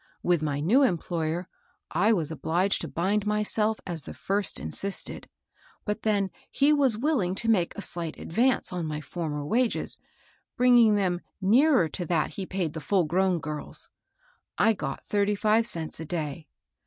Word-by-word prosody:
With 175 Hz, -3 st, +2 dB
my 145 Hz, -2 st, -1 dB
new 205 Hz, -, +4 dB
employer 170 Hz, -, 0 dB, 0.4 s
I 215 Hz, -, +3 dB
was 165 Hz, -8 st, +1 dB
obliged 175 Hz, +5 st, 0 dB
to 165 Hz, -, -4 dB
bind 195 Hz, +8 st, -1 dB
myself 210 Hz, +1 st, +1 dB
as 170 Hz, -3 st, -3 dB
the -, -, -9 dB
first 200 Hz, +1 st, -1 dB
insisted; 200 Hz, 0 st, -3 dB, 0.6 s
but 210 Hz, +1 st, -2 dB
then 200 Hz, -3 st, +1 dB, 0.2 s
he 285 Hz, +2 st, +3 dB
was 270 Hz, -7 st, +3 dB
willing 230 Hz, -, 0 dB
to 230 Hz, -, -2 dB
make 190 Hz, -7 st, +2 dB
a 200 Hz, -, -3 dB
slight 170 Hz, -2 st, -3 dB
advance 240 Hz, +3 st, 0 dB
on 175 Hz, -3 st, -3 dB
my 150 Hz, -1 st, -3 dB
former 150 Hz, -1 st, -4 dB
wages, 235 Hz, +8 st, 0 dB, 0.6 s
bringing 240 Hz, -3 st, +6 dB
them 180 Hz, -3 st, 0 dB, 0.2 s
nearer 230 Hz, -, +4 dB
to 175 Hz, -, -4 dB
that 160 Hz, -2 st, 0 dB
he 190 Hz, -2 st, -5 dB
paid 180 Hz, -5 st, -2 dB
the 160 Hz, -, -6 dB
full 190 Hz, +3 st, +2 dB
grown 180 Hz, +3 st, +1 dB
girls. 150 Hz, 0 st, -7 dB, 0.7 s
I 225 Hz, -, +4 dB
got 145 Hz, -9 st, -5 dB
thirty 205 Hz, 0 st, +1 dB
five 220 Hz, +2 st, +2 dB
cents 160 Hz, -6 st, -1 dB
a 160 Hz, -, -5 dB
day. 155 Hz, -2 st, -4 dB
190 Hz, 165 wpm, -27 LUFS, 165-215 Hz, 0.7 s, bringing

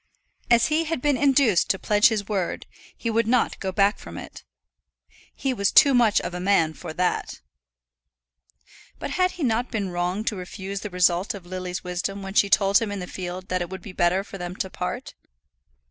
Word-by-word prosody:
As 235 Hz, 0 st, +4 dB
he 315 Hz, +2 st, +1 dB
had 325 Hz, -2 st, -2 dB
been 290 Hz, +2 st, +2 dB
induced 265 Hz, -7 st, +3 dB
to 190 Hz, -, +2 dB
pledge 205 Hz, +2 st, +4 dB
his 210 Hz, -3 st, -1 dB
word, 195 Hz, -5 st, -2 dB, 0.3 s
he 230 Hz, -, -2 dB
would 225 Hz, 0 st, +1 dB
not 245 Hz, +1 st, +1 dB
go 190 Hz, -2 st, -3 dB
back 200 Hz, +2 st, +2 dB
from -, -, -9 dB
it. -, -, -10 dB, 0.9 s
He 270 Hz, -2 st, -1 dB
was 200 Hz, -5 st, +1 dB
too 280 Hz, -2 st, +7 dB
much 235 Hz, -4 st, +4 dB
of -, -, -5 dB
a 180 Hz, -, -4 dB
man 180 Hz, -4 st, +2 dB
for 155 Hz, -, -8 dB
that! 180 Hz, +3 st, -1 dB, 1.6 s
But -, -, -5 dB
had 365 Hz, 0 st, +1 dB
he 350 Hz, -, -5 dB
not 240 Hz, 0 st, 0 dB
been 200 Hz, -5 st, -3 dB
wrong 180 Hz, +4 st, -1 dB
to 220 Hz, -, -1 dB
refuse 190 Hz, +1 st, -6 dB
the 210 Hz, -, -6 dB
result 180 Hz, +2 st, +2 dB
of 190 Hz, -3 st, -10 dB
Lily's 180 Hz, 0 st, -5 dB
wisdom 195 Hz, +2 st, -3 dB
when 195 Hz, 0 st, -6 dB
she 200 Hz, -1 st, +3 dB
told 200 Hz, 0 st, +4 dB
him 225 Hz, -3 st, -3 dB
in 205 Hz, -, -4 dB
the 180 Hz, -, -5 dB
field 180 Hz, +1 st, -7 dB
that 185 Hz, 0 st, 0 dB
it 175 Hz, -, -3 dB
would 190 Hz, -1 st, -8 dB
be 195 Hz, -, -9 dB
better 180 Hz, +2 st, +2 dB
for 195 Hz, -1 st, -10 dB
them 175 Hz, 0 st, -5 dB
to 190 Hz, -1 st, -4 dB
part? -, -, -5 dB
195 Hz, 205 wpm, -24 LUFS, 180-230 Hz, 1.6 s, too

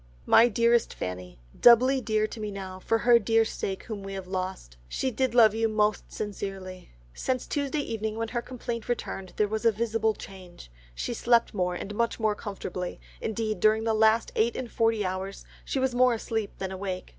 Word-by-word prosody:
"My 235 Hz, -, +7 dB
dearest 235 Hz, +1 st, +2 dB
Fanny,—Doubly 90 Hz, -, +3 dB
dear 215 Hz, -2 st, +1 dB
to 215 Hz, -, -7 dB
me 210 Hz, -1 st, -3 dB
now 190 Hz, -2 st, -7 dB
for 225 Hz, +4 st, +1 dB
her 235 Hz, +1 st, +5 dB
dear 225 Hz, +1 st, +3 dB
sake 195 Hz, -3 st, -4 dB
whom 215 Hz, -4 st, -6 dB
we 195 Hz, 0 st, -7 dB
have 190 Hz, -1 st, -6 dB
lost. 185 Hz, -, -5 dB
She 260 Hz, -, -2 dB
did 255 Hz, +1 st, -1 dB
love 220 Hz, -3 st, +7 dB
you 225 Hz, 0 st, +1 dB
most 215 Hz, -1 st, 0 dB
sincerely.... 195 Hz, -3 st, -6 dB, 0.2 s
Since 255 Hz, -1 st, -2 dB
Tuesday 285 Hz, +1 st, -1 dB
evening 220 Hz, -4 st, -3 dB
when 225 Hz, 0 st, -2 dB
her 240 Hz, 0 st, -2 dB
complaint 235 Hz, -2 st, -6 dB
returned, 195 Hz, -5 st, -4 dB
there 210 Hz, -, +2 dB
was 220 Hz, +2 st, -3 dB
a 230 Hz, -, +5 dB
visible 220 Hz, 0 st, 0 dB
change, 180 Hz, -, -12 dB, 0.2 s
she 240 Hz, -, -3 dB
slept 235 Hz, 0 st, +2 dB
more, 180 Hz, -3 st, 0 dB
and 200 Hz, +3 st, -6 dB
much 235 Hz, +2 st, -1 dB
more 215 Hz, -1 st, +2 dB
comfortably; 195 Hz, -4 st, -5 dB, 0.2 s
indeed 220 Hz, 0 st, -2 dB
during 215 Hz, +1 st, +3 dB
the 225 Hz, 0 st, +1 dB
last 220 Hz, +1 st, +3 dB
eight 230 Hz, +2 st, +2 dB
and 245 Hz, -3 st, -5 dB
forty 225 Hz, -2 st, +1 dB
hours 190 Hz, +1 st, -4 dB, 0.2 s
she -, -, -3 dB
was 260 Hz, -1 st, +1 dB
more 250 Hz, -1 st, +4 dB
asleep 220 Hz, -2 st, -3 dB
than 190 Hz, -1 st, -4 dB
awake. 190 Hz, -1 st, -5 dB
220 Hz, 190 wpm, -27 LUFS, 195-235 Hz, 0.2 s, My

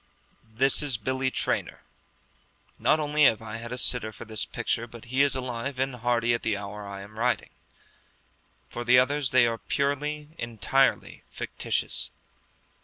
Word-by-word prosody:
This 130 Hz, +5 st, +3 dB
is 140 Hz, -5 st, -1 dB
Billy 130 Hz, +4 st, -1 dB
Traynor. -, -, -2 dB, 1.0 s
Not 155 Hz, -, +3 dB
only 150 Hz, 0 st, +3 dB
have 110 Hz, -, +5 dB
I 110 Hz, 0 st, -6 dB
had 115 Hz, +1 st, -7 dB
a 125 Hz, -, -3 dB
sitter 125 Hz, -3 st, +1 dB
for -, -, -10 dB
this 110 Hz, -1 st, -3 dB
picture, 120 Hz, +1 st, -2 dB
but 120 Hz, 0 st, -12 dB
he 135 Hz, -, +4 dB
is 140 Hz, -2 st, +3 dB
alive 130 Hz, +1 st, -3 dB
and 130 Hz, -1 st, -1 dB
hearty 120 Hz, 0 st, +2 dB
at 115 Hz, -, 0 dB
the 110 Hz, -3 st, 0 dB
hour 100 Hz, 0 st, -7 dB
I 100 Hz, 0 st, -7 dB
am 105 Hz, +2 st, -11 dB
writing. 125 Hz, +1 st, 0 dB, 1.2 s
For 120 Hz, -, -5 dB
the 125 Hz, +1 st, +6 dB
others, 135 Hz, +2 st, +3 dB
they 130 Hz, -1 st, +5 dB
are 115 Hz, -1 st, -1 dB
purely, 145 Hz, +2 st, -1 dB
entirely 120 Hz, +4 st, +1 dB
fictitious. -, -, -2 dB
125 Hz, 160 wpm, -27 LUFS, 115-135 Hz, 1.2 s, the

